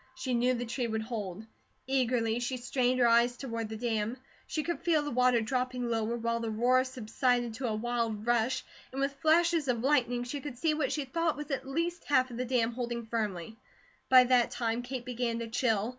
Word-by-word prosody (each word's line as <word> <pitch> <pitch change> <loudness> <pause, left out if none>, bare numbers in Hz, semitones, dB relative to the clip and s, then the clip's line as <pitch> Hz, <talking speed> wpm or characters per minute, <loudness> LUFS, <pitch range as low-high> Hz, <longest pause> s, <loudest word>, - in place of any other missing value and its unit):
She 260 -1 -3
knew 245 +1 +2
the 245 0 -3
tree 240 +1 -2
would 220 -1 -2
hold. 215 -3 -5 0.4
Eagerly 245 -3 +1
she 250 +1 -2
strained 250 +1 0
her 240 - +5
eyes 235 +1 +4
toward 230 -4 -4
the 220 - -5
dam. 225 0 -1 0.3
She 310 - -2
could 340 -3 -2
feel 320 -4 +2
the 290 - -4
water 250 -1 +3
dropping 250 +1 -2
lower, 225 +1 0
while 230 0 -1
the 230 -1 -3
roar 245 +4 +3
subsided 245 -1 0
to 250 +2 -3
a 220 - -1
wild 225 -1 -2
rush, 240 +1 +1 0.3
and 265 - -5
with 275 0 0
flashes 330 -1 +3
of 240 -2 0
lightning 245 -4 +2
she 275 +4 -5
could 280 -4 -7
see 315 +4 +1
what 300 -3 -1
she 295 -2 -2
thought 325 +3 -1
was 295 0 -6
at 265 -1 -3
least 335 +5 -2
half 260 -3 +2
of 235 - -7
the 250 - -1
dam 240 -2 +1
holding 235 -1 -4
firm. 215 -4 -3 0.5
By 255 -1 +9
that 250 -1 +3
time 230 0 -1
Kate 245 0 -6
began 240 -2 -2
to 230 0 -4
chill. 225 -2 +1
245 Hz, 210 wpm, -30 LUFS, 230-260 Hz, 0.5 s, By